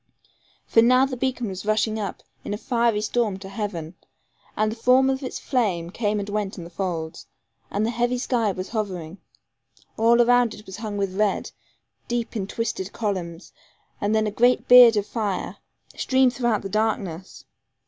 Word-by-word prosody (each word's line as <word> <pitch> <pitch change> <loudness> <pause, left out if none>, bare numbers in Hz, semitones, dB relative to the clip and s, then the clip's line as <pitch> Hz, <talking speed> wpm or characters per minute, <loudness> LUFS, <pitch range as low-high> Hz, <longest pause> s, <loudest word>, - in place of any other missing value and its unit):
For 225 - +4
now 255 +3 +5
the 270 -1 -4
beacon 250 -2 -2
was 185 -1 -6
rushing 215 +1 0
up, 200 -2 -5 0.2
in 205 - -3
a - - -6
fiery 230 -2 +1
storm 215 -2 0
to 190 0 -10
heaven, 195 -6 -5 0.6
and 215 0 +1
the - - -5
form 255 +3 +4
of 265 +1 -3
its 255 - -5
flame 185 -10 -1
came 210 0 -1
and 200 - -4
went 205 -1 -3
in 175 - -7
the 170 - -11
folds, 165 -3 -4 0.4
and 205 +2 -1
the 230 - 0
heavy 240 +1 0
sky 240 -4 0
was 185 0 -6
hovering. 190 -5 -4 0.8
All 230 +2 +4
around 245 -1 +4
it 210 - -14
was 190 -1 -9
hung 210 -2 -5
with 195 -2 -2
red, 210 -2 0 0.6
deep 240 0 -3
in 195 -3 -2
twisted 215 -3 -3
columns, 185 -6 -4 0.5
and 205 +2 +1
then 220 0 +2
a 210 - -1
giant 245 +4 +2
beard 245 -3 +9
of 205 - 0
fire 210 -5 -3 0.4
streamed 260 -1 +2
throughout 240 -3 0
the 195 - -5
darkness. 195 -4 -2
215 Hz, 180 wpm, -24 LUFS, 195-240 Hz, 0.8 s, beard